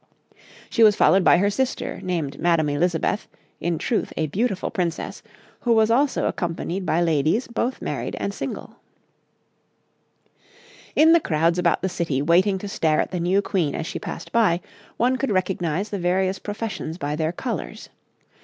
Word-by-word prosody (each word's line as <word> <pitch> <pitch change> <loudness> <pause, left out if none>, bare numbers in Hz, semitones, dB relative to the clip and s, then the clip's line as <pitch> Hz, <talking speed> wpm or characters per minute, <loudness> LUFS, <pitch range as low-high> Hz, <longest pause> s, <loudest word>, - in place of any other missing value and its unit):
'She 230 - +1
was 215 -2 +7
followed 190 0 +4
by - - +6
her 200 +3 +2
sister, 260 +5 -2
named 160 -7 -3
Madame 165 -3 +2
Elizabeth, 170 +7 0 0.3
in 170 0 -1
truth 225 - -1
a 160 - +1
beautiful 195 - -1
Princess, 175 -6 -3 0.4
who 240 - +2
was 220 0 +4
also 270 +4 +2
accompanied 175 +2 -3
by 160 - +2
ladies 165 - +2
both 235 +2 -2
married - - -3
and - - -2
single.' - - -6 2.2
In 320 +2 +6
the 335 - +6
crowds 165 - +1
about 175 0 +1
the - - +2
city 165 -7 -2
waiting 180 +7 +3
to 205 - -6
stare 160 -5 +1
at - - -1
the 180 - -2
new 185 +4 +2
Queen 170 -8 0
as 160 - -3
she - - -5
passed - - -7
by, 215 -7 +3 0.4
one 255 +2 +2
could 275 - -1
recognise 185 0 -1
the 200 - -3
various 185 +2 0
professions 205 -6 -5
by 150 -4 -3
their 160 +1 -1
colours. 230 +7 -5
180 Hz, 165 wpm, -23 LUFS, 165-210 Hz, 2.2 s, was